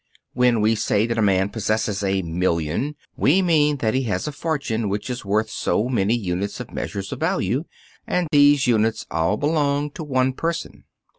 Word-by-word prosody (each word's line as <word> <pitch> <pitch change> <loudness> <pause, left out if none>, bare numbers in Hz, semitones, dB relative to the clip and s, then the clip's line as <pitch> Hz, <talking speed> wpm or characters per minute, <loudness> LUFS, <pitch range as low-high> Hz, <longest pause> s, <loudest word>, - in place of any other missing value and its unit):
When 125 -3 +3
we 110 +1 +3
say 105 -1 +1
that 115 -1 -1
a - - +3
man 95 -1 +2
possesses 110 -1 -1
a 95 -1 0
million, 85 - -1 0.2
we 180 +8 +3
mean 150 -4 +3
that 110 -4 0
he 130 - +1
has 110 +6 -2
a - - -2
fortune 135 -8 -2
which 105 +5 -3
is 125 - -5
worth 105 +2 0
so 115 +4 0
many 110 -2 +1
units 100 -2 -3
of - - -8
measure 100 - -4
of 135 - -5
values, 165 -4 0 0.4
and 180 -2 0
these 145 -2 +5
units 110 -2 +1
all 85 +6 +1
belong 145 0 0
to 160 - -7
one 130 -3 +1
person. 165 +4 -4
115 Hz, 180 wpm, -22 LUFS, 100-145 Hz, 0.4 s, these